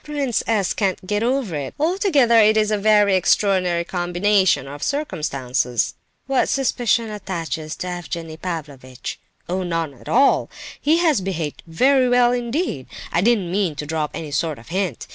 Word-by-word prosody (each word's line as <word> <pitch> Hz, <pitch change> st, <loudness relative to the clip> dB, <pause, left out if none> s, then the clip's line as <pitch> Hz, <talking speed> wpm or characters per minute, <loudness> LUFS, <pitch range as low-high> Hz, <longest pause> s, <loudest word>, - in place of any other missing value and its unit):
Prince 285 Hz, -5 st, -1 dB
S. 210 Hz, -5 st, +1 dB
can't 190 Hz, -2 st, -1 dB
get 205 Hz, +2 st, -1 dB
over 245 Hz, -5 st, 0 dB
it. 140 Hz, -2 st, -5 dB
Altogether 300 Hz, -, +3 dB
it 215 Hz, 0 st, +5 dB
is 215 Hz, 0 st, +2 dB
a 210 Hz, -, +2 dB
very 205 Hz, -1 st, +4 dB
extraordinary 185 Hz, -2 st, +2 dB
combination 180 Hz, -2 st, +1 dB
of 145 Hz, +1 st, -9 dB
circumstances." 130 Hz, -, -1 dB, 0.3 s
"What 270 Hz, -1 st, +1 dB
suspicion 240 Hz, -4 st, +1 dB
attaches 165 Hz, -6 st, -4 dB
to 185 Hz, -, -5 dB
Evgenie 170 Hz, -2 st, -5 dB
Pavlovitch?" 145 Hz, -8 st, -6 dB, 0.3 s
"Oh, 185 Hz, +2 st, -2 dB
none 165 Hz, -4 st, -2 dB
at 125 Hz, -, -13 dB
all! 275 Hz, +3 st, +3 dB, 0.3 s
He 310 Hz, +3 st, +3 dB
has 320 Hz, -, +2 dB
behaved 170 Hz, -6 st, -4 dB
very 255 Hz, +9 st, +3 dB
well 245 Hz, 0 st, +4 dB
indeed. 245 Hz, -, -2 dB, 0.2 s
I 170 Hz, -, +2 dB
didn't 205 Hz, -5 st, +2 dB
mean 185 Hz, -5 st, 0 dB
to 150 Hz, -, -5 dB
drop 155 Hz, 0 st, -2 dB
any 155 Hz, -2 st, -6 dB
sort 150 Hz, +1 st, -1 dB
of 115 Hz, -, -15 dB
hint. 185 Hz, -, -2 dB
190 Hz, 160 wpm, -21 LUFS, 160-235 Hz, 0.3 s, it